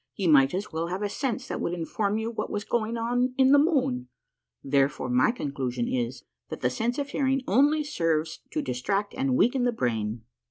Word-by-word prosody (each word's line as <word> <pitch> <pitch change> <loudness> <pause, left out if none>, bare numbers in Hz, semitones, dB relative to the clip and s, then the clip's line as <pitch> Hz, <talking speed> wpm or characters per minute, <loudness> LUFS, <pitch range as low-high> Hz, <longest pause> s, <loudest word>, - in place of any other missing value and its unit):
Ye 195 - -1
might 140 -1 +5
as 200 +3 -4
well 165 +1 -2
have 185 +4 -3
a 205 - -1
sense 260 +2 -3
that - - -4
would 170 - -1
inform 200 +5 -1
you 220 +1 -2
what 230 - -4
was 205 - -3
going 230 0 -1
on 245 +2 0
in 265 0 +5
the 285 - +7
moon. 255 - +1 0.5
Therefore, 135 -2 +1
my 125 +1 +4
conclusion 130 - -3
is, 125 +1 -2 0.3
that - - -6
the 125 - +1
sense 235 - -1
of 285 -1 -2
hearing 270 -1 0
only 290 +8 +3
serves 165 - -1
to - - -2
distract 195 +12 -2
and 265 -1 0
weaken 245 +2 +3
the 245 - +2
brain. 115 - -2
200 Hz, 200 wpm, -27 LUFS, -, 0.5 s, the